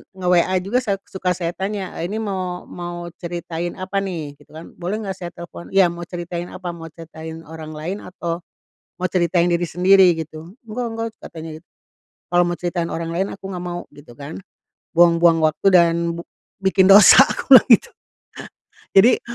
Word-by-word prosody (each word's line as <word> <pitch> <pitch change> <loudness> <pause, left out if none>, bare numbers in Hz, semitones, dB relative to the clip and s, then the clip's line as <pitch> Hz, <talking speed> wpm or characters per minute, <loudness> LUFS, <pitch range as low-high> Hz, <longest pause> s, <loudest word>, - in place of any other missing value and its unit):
nge-WA 180 0 +2
juga 215 +7 +1
saya 215 -6 -1
suka 185 -1 -2
saya 170 -1 -3
tanya, 195 +1 -4
eee, 170 - -2
"Ini 215 +4 -4
mau 185 -3 -4
mau 175 0 -7
ceritain 170 0 -5
apa 190 +1 -3
nih?" 160 -7 -5
Gitu - - -21
kan, 160 - -10
"Boleh 200 +5 -3
nggak 195 - -4
saya 175 - -5
telepon?" 170 0 -10
"Ya 190 -3 +5
mau 170 0 -8
ceritain 175 0 -5
apa? 180 -1 -6
Mau 165 -1 -9
ceritain 160 0 -10
orang 160 0 -9
lain 170 +7 -5
atau, 170 -3 -5 0.6
mau 185 0 -1
ceritain 175 -1 +2
diri 175 0 +1
sendiri?" 185 +1 +5
Gitu, 160 +2 -8
"Enggak 240 +3 -4
enggak," 225 0 -3
katanya 160 0 -9
git - - -37 0.7
"Kalau 175 0 +4
mau 175 - -2
ceritain 175 -1 -2
orang 165 0 -4
lain 185 +4 -1
aku 195 - -12
nggak 180 -1 -5
mau." 175 0 -4
Gitu 145 -4 -15
kan, 145 +4 -8 0.6
buang-buang 170 -1 +5
waktu 155 +5 0
dan 170 -2 +5 0.2
bu - - -5 0.4
bikin 190 0 +3
dosa, 200 +5 +9
aku 275 - +3
bilang 255 - +8
gitu. 360 - +5 1.0
Jadi 220 +6 +6
175 Hz, 175 wpm, -20 LUFS, 170-190 Hz, 1.0 s, dosa